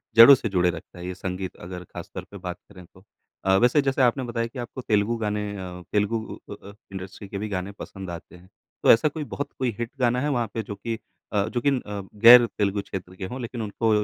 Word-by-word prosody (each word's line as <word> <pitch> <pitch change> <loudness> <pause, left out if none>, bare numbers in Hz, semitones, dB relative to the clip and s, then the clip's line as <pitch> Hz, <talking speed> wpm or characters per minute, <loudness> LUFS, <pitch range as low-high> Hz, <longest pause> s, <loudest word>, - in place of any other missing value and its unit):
जड़ों 115 +5 +11
से 120 -4 -3
जुड़े 90 -2 +3
रखता 90 0 -8
है, 90 - -7
ये 90 - -3
संगीत 95 0 -4
अगर 90 0 -8
खास - - -9
तौर - - -5
पे 100 - -8
बात 90 -1 -5
करें 90 -3 -12
तो। 95 +2 -21 0.4
अ, 95 0 +5
वैसे 125 +7 +4
जैसे 135 0 0
आपने 130 +1 +3
बताया 115 -1 -2
कि 125 +2 -9
आपको 120 +2 -6
तेलुगु 105 0 +1
गाने, 105 -1 -2
अ, 90 -1 -7
तेलुगु 105 +2 +1 0.3
उ 100 - -6
अ 100 - -13
अ, - - -11 0.2
इंडस्ट्री 95 +1 -8
के 100 - -5
भी 105 +2 -4
गाने 95 0 -3
पसंद 95 -2 -7
आते 85 +1 -9
हैं, 90 +1 -17 0.3
तो - - +8
ऐसा 115 +6 +5
कोई 155 +1 -5
बहुत 145 0 -4
कोई 130 -2 +1
हिट 120 +1 -3
गाना 125 0 +2
है 145 - 0
वहाँ 120 -5 0
पे 115 - -2
जो 100 0 -6
कि 115 +1 -4 0.4
अ, 100 -1 +2
जो 120 +1 -2
कि 140 - +3
अ, 105 -7 -2 0.2
गैर 120 0 +11
तेलुगु 100 0 +1
क्षेत्र 90 -2 -7
के 95 - -5
हों, 125 +7 -6
लेकिन 120 0 -5
उनको 110 +2 -1
105 Hz, 250 wpm, -25 LUFS, 95-120 Hz, 0.4 s, जड़ों